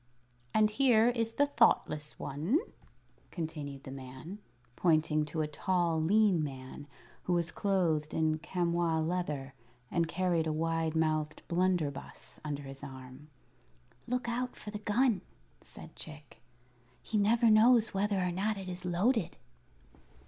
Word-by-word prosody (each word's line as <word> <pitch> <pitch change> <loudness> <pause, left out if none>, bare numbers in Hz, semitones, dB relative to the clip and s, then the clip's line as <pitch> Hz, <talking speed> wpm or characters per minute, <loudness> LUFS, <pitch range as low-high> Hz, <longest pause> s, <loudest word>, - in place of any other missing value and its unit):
"And 215 -1 +3
here 240 -2 +4
is 230 -2 -1
the 285 +5 +3
Thoughtless 155 - +2
One," 160 - 0 0.7
continued 150 -5 -5
the 130 - -8
man, 135 +8 -9 0.4
pointing 155 -2 +2
to 155 +2 -3
a 155 - 0
tall, 170 +1 0
lean 195 -1 +3
man 135 0 -7 0.4
who 180 - +1
was 170 -1 0
clothed 170 -6 0
in 155 -1 +1
chamois 170 -1 0
leather 155 -5 -2 0.4
and 170 -1 +1
carried 170 -1 0
a - - 0
wide 165 0 -1
mouthed 155 -1 0
blunderbuss 170 -5 -1
under 145 -2 -4
his 135 0 -9
arm. 130 +1 -10 0.8
"Look 250 0 -1
out 245 +1 -2
for 210 - -9
the 210 - -5
gun," 210 -1 +2 0.4
said - - -13
Chick; 150 -7 -11 0.6
"he 215 - 0
never 225 +2 +4
knows 225 +1 +5
whether 200 0 +1
or 180 -1 0
not 200 +4 -1
it 190 -1 -7
is 180 0 -6
loaded." 185 +4 +1
170 Hz, 135 wpm, -32 LUFS, 155-210 Hz, 0.8 s, knows